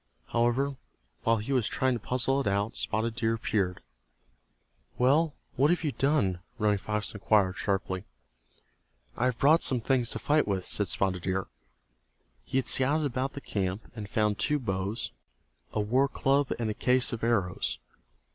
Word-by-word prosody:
However, 125 Hz, +4 st, +1 dB, 0.4 s
while 115 Hz, -, +3 dB
he 110 Hz, +6 st, -3 dB
was 125 Hz, -4 st, +2 dB
trying 130 Hz, +1 st, +1 dB
to 120 Hz, -, -2 dB
puzzle 130 Hz, +4 st, 0 dB
it -, -, -3 dB
out 100 Hz, +2 st, 0 dB
Spotted 110 Hz, +1 st, -1 dB
Deer 115 Hz, -1 st, +1 dB
appeared. 95 Hz, -5 st, -1 dB, 1.1 s
"Well, 145 Hz, +5 st, +3 dB, 0.2 s
what 140 Hz, +3 st, +3 dB
have 175 Hz, 0 st, +1 dB
you 150 Hz, -, 0 dB
done?" 135 Hz, -11 st, +1 dB, 0.2 s
Running 105 Hz, -2 st, +2 dB
Fox 105 Hz, +1 st, -2 dB
inquired, 100 Hz, -2 st, +2 dB
sharply. 95 Hz, -2 st, -1 dB, 1.1 s
"I 120 Hz, -, 0 dB
have 125 Hz, -2 st, +1 dB
brought 155 Hz, +4 st, +5 dB
some 125 Hz, -, +2 dB
things 125 Hz, 0 st, +1 dB
to -, -, -2 dB
fight 150 Hz, +4 st, +2 dB
with," 95 Hz, -3 st, -1 dB
said 105 Hz, -, 0 dB
Spotted 90 Hz, -1 st, 0 dB
Deer. 95 Hz, +1 st, -1 dB, 1.0 s
He 130 Hz, -, -2 dB
had 130 Hz, -, 0 dB
scouted 145 Hz, +4 st, +3 dB
about 130 Hz, 0 st, -2 dB
the 140 Hz, -, -7 dB
camp, 95 Hz, -2 st, -3 dB
and 105 Hz, -3 st, -7 dB
found 105 Hz, -1 st, +1 dB
two 150 Hz, -, +2 dB
bows, 100 Hz, -3 st, -2 dB, 0.6 s
a -, -, -2 dB
war 125 Hz, +7 st, +2 dB
club 140 Hz, +1 st, +1 dB
and 115 Hz, -2 st, -1 dB
a -, -, -2 dB
case 125 Hz, +3 st, +2 dB
of 115 Hz, -, -5 dB
arrows. 90 Hz, -, 0 dB
115 Hz, 165 wpm, -29 LUFS, 100-135 Hz, 1.1 s, brought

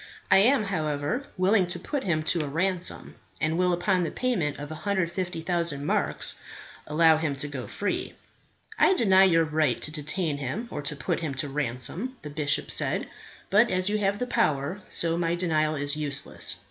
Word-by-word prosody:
I -, -, +8 dB
am, 240 Hz, +5 st, +4 dB
however, 155 Hz, -, -2 dB
willing 185 Hz, 0 st, +3 dB
to 175 Hz, -, 0 dB
put 285 Hz, -3 st, -3 dB
him 155 Hz, -5 st, 0 dB
to 160 Hz, +1 st, +2 dB
a -, -, -4 dB
ransom, 180 Hz, +4 st, -1 dB, 0.2 s
and 160 Hz, 0 st, 0 dB
will 180 Hz, +1 st, +2 dB
upon 180 Hz, +1 st, +1 dB
the 165 Hz, -, -1 dB
payment 200 Hz, -, -1 dB
of 145 Hz, +1 st, -7 dB
150,000 170 Hz, -4 st, -2 dB
marks -, -, +1 dB, 0.5 s
allow 160 Hz, +1 st, +4 dB
him 155 Hz, -3 st, -1 dB
to 135 Hz, +2 st, -1 dB
go 140 Hz, -4 st, -6 dB
free." 205 Hz, -, -3 dB, 0.6 s
"I 385 Hz, -, +5 dB
deny 195 Hz, -, +5 dB
your 165 Hz, -3 st, +4 dB
right 150 Hz, -5 st, +1 dB
to 150 Hz, -, -5 dB
detain 155 Hz, +1 st, -2 dB
him 145 Hz, -, -4 dB
or -, -, -4 dB
to 145 Hz, +1 st, -2 dB
put -, -, -2 dB
him 155 Hz, -5 st, -4 dB
to 135 Hz, +2 st, -2 dB
ransom," 145 Hz, -, -2 dB
the 150 Hz, -, -7 dB
bishop 145 Hz, -1 st, -1 dB
said. -, -, -1 dB, 0.4 s
"But 215 Hz, +4 st, +5 dB
as 185 Hz, +1 st, +2 dB
you 210 Hz, 0 st, 0 dB
have 200 Hz, 0 st, +1 dB
the 250 Hz, -, -2 dB
power, 155 Hz, -, 0 dB
so 165 Hz, 0 st, +1 dB
my 170 Hz, 0 st, 0 dB
denial 155 Hz, -3 st, 0 dB
is 145 Hz, 0 st, +1 dB
useless. 145 Hz, -2 st, -1 dB
165 Hz, 180 wpm, -26 LUFS, 150-190 Hz, 0.6 s, I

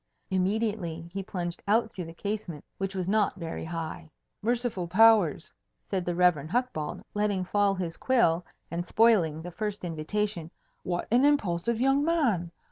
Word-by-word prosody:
Immediately 185 Hz, -4 st, -1 dB
he 195 Hz, -, -2 dB
plunged 175 Hz, -2 st, -4 dB
out 220 Hz, +2 st, +2 dB
through 180 Hz, -, -6 dB
the 165 Hz, -, -9 dB
casement, 200 Hz, -6 st, -4 dB
which 195 Hz, 0 st, -3 dB
was 185 Hz, -2 st, -2 dB
not 205 Hz, -1 st, +2 dB
very 165 Hz, -4 st, -5 dB
high. 165 Hz, 0 st, -5 dB, 0.3 s
"Merciful 235 Hz, -5 st, -1 dB
powers!" 205 Hz, -4 st, +4 dB, 0.3 s
said 185 Hz, -3 st, -2 dB
the 175 Hz, -, -1 dB
Rev. 170 Hz, -4 st, +3 dB
Hucbald, 235 Hz, -9 st, -2 dB
letting 205 Hz, -2 st, 0 dB
fall 200 Hz, +1 st, +2 dB
his 175 Hz, -3 st, -4 dB
quill 180 Hz, -10 st, +2 dB, 0.3 s
and 170 Hz, +1 st, -2 dB
spoiling 180 Hz, -9 st, +3 dB
the 180 Hz, -, -6 dB
first 210 Hz, +2 st, -4 dB
invitation, 170 Hz, +2 st, -2 dB, 0.3 s
"what 175 Hz, -1 st, -3 dB
an 245 Hz, +3 st, +5 dB
impulsive 230 Hz, -6 st, +2 dB
young 270 Hz, +3 st, +3 dB
man! 250 Hz, -, +1 dB
190 Hz, 150 wpm, -28 LUFS, 170-220 Hz, 0.3 s, an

